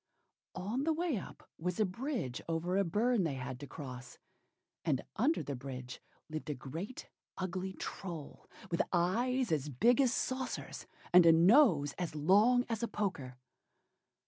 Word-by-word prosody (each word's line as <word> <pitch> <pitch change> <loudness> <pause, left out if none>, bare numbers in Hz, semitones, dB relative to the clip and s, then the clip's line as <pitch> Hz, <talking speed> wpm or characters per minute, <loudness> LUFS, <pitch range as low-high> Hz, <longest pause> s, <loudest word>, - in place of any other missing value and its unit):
On 210 +9 -2
the 320 +1 +2
way 330 -2 0
up 190 - -9
was 180 +3 -2
a 215 - +4
bridge 210 - -3
over 165 +3 -1
a 200 - +3
burn 210 +5 +2
they 155 -5 -1
had 130 -1 -5
to 145 - -8
cross; 125 -5 -8 0.7
and 150 -6 0
under 285 +10 +2
the 140 - -4
bridge 125 -1 -7 0.3
lived 155 0 -6
a 150 - -1
great 165 - -7 0.3
ugly 185 +1 -3
Troll, 170 -6 -7 0.2
with 170 - +2
eyes 235 +8 +1
as 150 -2 0
big 235 - +4
as 260 -3 +3
saucers, 260 0 -3 0.3
and 175 -1 +8
a - - +10
nose 170 - +5
as 175 -4 -3
long 210 - +4
as 225 -2 -2
a 235 - 0
poker. 145 - -3
180 Hz, 155 wpm, -33 LUFS, 150-235 Hz, 0.7 s, a